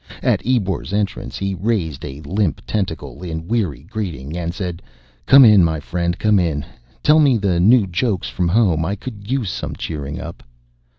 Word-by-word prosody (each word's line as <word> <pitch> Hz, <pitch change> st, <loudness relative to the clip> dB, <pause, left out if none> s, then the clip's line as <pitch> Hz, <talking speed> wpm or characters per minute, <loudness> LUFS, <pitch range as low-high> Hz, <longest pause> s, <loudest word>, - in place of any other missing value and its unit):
At -, -, +2 dB
Ebor's 100 Hz, -6 st, -1 dB
entrance 100 Hz, -1 st, -2 dB
he 95 Hz, 0 st, -2 dB
raised 90 Hz, -, -2 dB
a 70 Hz, +2 st, -7 dB
limp 90 Hz, +2 st, -1 dB
tentacle 80 Hz, -, -3 dB
in 80 Hz, -2 st, -5 dB
weary 95 Hz, -, -1 dB
greeting 85 Hz, -, -5 dB
and 85 Hz, -1 st, -2 dB
said, 90 Hz, -2 st, -5 dB, 0.5 s
"Come 135 Hz, -1 st, +9 dB
in, 105 Hz, -5 st, +7 dB
my 80 Hz, -2 st, +1 dB
friend, 85 Hz, +3 st, -2 dB
come 105 Hz, -2 st, +3 dB
in. 80 Hz, -5 st, -1 dB, 0.4 s
Tell 155 Hz, +1 st, +5 dB
me 140 Hz, -5 st, +4 dB
the 95 Hz, -5 st, 0 dB
new 110 Hz, +4 st, +5 dB
jokes 95 Hz, +1 st, -1 dB
from 90 Hz, -1 st, -1 dB
home. 90 Hz, -4 st, +2 dB
I 95 Hz, +5 st, -1 dB
could 105 Hz, -1 st, -9 dB
use 125 Hz, -8 st, -1 dB
some -, -, -5 dB
cheering 75 Hz, 0 st, -5 dB
up." 85 Hz, -, -8 dB
90 Hz, 175 wpm, -20 LUFS, 80-105 Hz, 0.5 s, Come